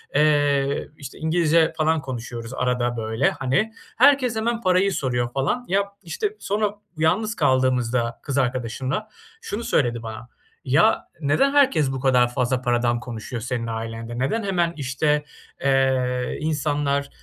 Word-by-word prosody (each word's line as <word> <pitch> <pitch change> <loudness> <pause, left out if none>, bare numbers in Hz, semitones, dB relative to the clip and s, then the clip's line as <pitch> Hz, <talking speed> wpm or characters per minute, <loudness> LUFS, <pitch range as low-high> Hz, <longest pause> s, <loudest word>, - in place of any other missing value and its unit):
eee, 145 -2 +2
işte, 140 -2 -9
İngilizce 160 0 +2
falan 160 0 +2
konuşuyoruz 120 -2 -6
arada 125 -2 0
böyle, 110 0 +1
hani. 190 +13 0 0.2
Herkes 260 -2 +5
hemen 230 +1 -1
parayı 185 0 +3
soruyor 125 -6 -1
falan. 150 - -1
Ya, 195 +2 +2 0.2
işte, 415 - -3
sonra 210 0 -1 0.2
yalnız 200 +8 +1
kaldığımızda 125 -2 +1
kız 140 -2 -3
arkadaşımla 130 - -1 0.3
şunu 220 +3 -4
söyledi 120 - 0
bana: 110 +1 -7 0.4
"Ya, - - +3
neden 270 - +2
herkes 260 - +3
bu 135 - -3
kadar 125 -2 +3
fazla 125 +1 0
paradan 120 -1 +1
konuşuyor 120 0 -6
senin 120 -1 -3
ailende? 115 +1 -5
Neden 210 - 0
hemen, 175 -4 0
işte, 150 +2 0 0.4
eee, 130 -2 +1
insanlar, 145 -2 0
135 Hz, 130 wpm, -23 LUFS, 125-170 Hz, 0.4 s, Herkes